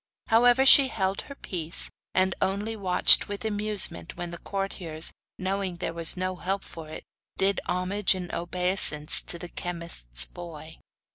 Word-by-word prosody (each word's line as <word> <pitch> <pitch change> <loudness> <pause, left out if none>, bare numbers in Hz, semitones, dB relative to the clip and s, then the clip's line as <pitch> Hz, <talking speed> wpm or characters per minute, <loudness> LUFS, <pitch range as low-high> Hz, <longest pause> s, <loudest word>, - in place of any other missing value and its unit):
However, 245 +3 +4
she 270 0 +8
held 195 -5 -2
her 280 - -9
peace, 170 - +3 0.2
and 185 0 +2
only 205 +4 -2
watched 190 -4 +4
with 205 +2 -7
amusement 205 - -1
when 175 -1 -6
the 170 - -9
courtiers, 185 -5 -3 0.2
knowing 190 -1 -3
there 165 - -5
was 165 +1 +3
no 185 0 -3
help 195 +2 -3
for 160 -2 -11
it, 155 - -9 0.3
did 195 0 0
homage 185 +2 +1
and 180 -1 -7
obeisance 175 -3 +2
to 170 - -5
the 175 0 -9
chemist's 165 - -2
boy. 160 - -11
185 Hz, 150 wpm, -26 LUFS, 170-200 Hz, 0.3 s, she